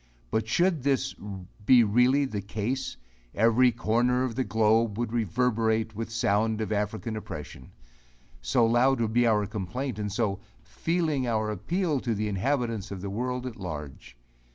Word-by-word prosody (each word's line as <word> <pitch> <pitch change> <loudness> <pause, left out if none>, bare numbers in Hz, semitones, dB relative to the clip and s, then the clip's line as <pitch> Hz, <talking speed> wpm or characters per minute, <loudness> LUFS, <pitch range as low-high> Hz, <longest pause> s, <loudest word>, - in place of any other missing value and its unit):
But 110 0 0
should 170 +5 +2
this 135 -1 0 0.5
be 120 +3 +6
really 125 +6 +3
the 105 -6 -4
case, 120 +7 -3 0.4
every 115 +4 +4
corner 120 +2 +1
of 130 -3 -2
the 130 - 0
globe 110 -1 +2
would 120 -1 -2
reverberate 110 0 +1
with 115 +2 -3
the 115 - -11
sound 110 0 +1
of 110 0 -3
African 105 +2 -2
oppression; 75 -10 -8 0.7
so - - +2
loud 120 +3 +3
would 110 -1 0
be 120 0 +4
our 105 -2 +3
complaint, 110 +4 -4
and 105 -1 -3
so 100 -2 -1 0.2
"feeling 160 -6 -1
our 110 -2 0
appeal" 155 - -1
to 120 -3 -2
the 105 +1 -1
inhabitants 115 0 -1
of 95 -2 -6
the 100 0 -4
world 125 +4 -2
at 125 -3 -6
large. 75 - -7
115 Hz, 160 wpm, -27 LUFS, 105-125 Hz, 0.7 s, be